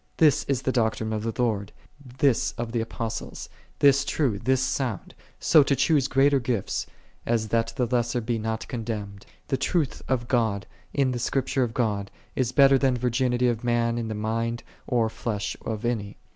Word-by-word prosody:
This 150 Hz, -4 st, +4 dB
is 135 Hz, -2 st, -1 dB
the 130 Hz, -, +1 dB
doctrine 110 Hz, -2 st, 0 dB
of 110 Hz, -, -2 dB
the 115 Hz, +1 st, -2 dB
Lord, 105 Hz, -5 st, 0 dB, 0.5 s
this 135 Hz, -4 st, +2 dB
of 120 Hz, -1 st, -4 dB
the 115 Hz, -1 st, 0 dB
Apostles, 115 Hz, 0 st, -5 dB, 0.3 s
this 140 Hz, 0 st, +5 dB
true, 135 Hz, -8 st, 0 dB
this 130 Hz, +3 st, +2 dB
sound, 130 Hz, -5 st, -2 dB, 0.3 s
so 155 Hz, -, +6 dB
to 140 Hz, 0 st, +2 dB
choose 140 Hz, 0 st, +3 dB
greater 140 Hz, +1 st, +4 dB
gifts, 120 Hz, -5 st, -2 dB, 0.4 s
as 115 Hz, -2 st, 0 dB
that 115 Hz, 0 st, 0 dB
the 125 Hz, -, +1 dB
lesser 120 Hz, 0 st, 0 dB
be 115 Hz, 0 st, -2 dB
not 110 Hz, 0 st, -3 dB
condemned. 105 Hz, -4 st, -5 dB, 0.2 s
The 135 Hz, -, +1 dB
truth 155 Hz, -3 st, 0 dB
of 120 Hz, -2 st, 0 dB
God, 110 Hz, -6 st, +1 dB, 0.3 s
in 135 Hz, -2 st, +1 dB
the 125 Hz, -, -2 dB
Script 130 Hz, +2 st, -1 dB
ure 130 Hz, -, +4 dB
of 115 Hz, -2 st, -3 dB
God, 105 Hz, -5 st, 0 dB, 0.3 s
is 125 Hz, -2 st, 0 dB
better 135 Hz, 0 st, +6 dB
than 130 Hz, -2 st, +2 dB
virginity 125 Hz, 0 st, +1 dB
of 120 Hz, -1 st, -1 dB
man 120 Hz, -1 st, +1 dB
in 115 Hz, -, -3 dB
the 110 Hz, -, -3 dB
mind 115 Hz, +2 st, -2 dB, 0.2 s
or 120 Hz, -2 st, +2 dB
flesh 110 Hz, -2 st, -3 dB
of 110 Hz, +1 st, -4 dB
any. 110 Hz, -4 st, -2 dB
120 Hz, 185 wpm, -26 LUFS, 110-130 Hz, 0.5 s, so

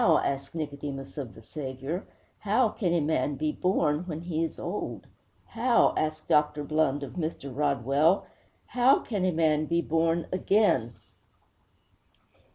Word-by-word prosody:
_' 165 Hz, -9 st, +4 dB
asked 140 Hz, +2 st, -3 dB
Nicodemus 140 Hz, -3 st, -5 dB
of 120 Hz, -8 st, -6 dB
the 110 Hz, -, -14 dB
Saviour. 135 Hz, -, -5 dB, 0.4 s
'How 220 Hz, +3 st, +2 dB
can 190 Hz, -5 st, -1 dB
a 170 Hz, -1 st, +2 dB
man 145 Hz, -2 st, 0 dB
be 155 Hz, +2 st, -1 dB
born 150 Hz, -4 st, +1 dB
when 160 Hz, -2 st, -4 dB
he 165 Hz, -2 st, -2 dB
is 165 Hz, -, -4 dB
old?' -, -, -4 dB, 0.4 s
'How?' 240 Hz, +1 st, +3 dB
asked 155 Hz, 0 st, -2 dB
Dr. 150 Hz, 0 st, +2 dB
Blund 145 Hz, -2 st, +1 dB
of 135 Hz, -, -7 dB
Mr. 155 Hz, -6 st, -4 dB
Rodwell. 145 Hz, +5 st, +2 dB, 0.4 s
'How 250 Hz, +2 st, +4 dB
can 200 Hz, -5 st, -2 dB
a 185 Hz, -, +2 dB
man 155 Hz, -2 st, +2 dB
be 170 Hz, 0 st, +1 dB
born 165 Hz, +1 st, +1 dB
again?' 185 Hz, -, +2 dB
155 Hz, 145 wpm, -28 LUFS, 140-175 Hz, 0.4 s, _'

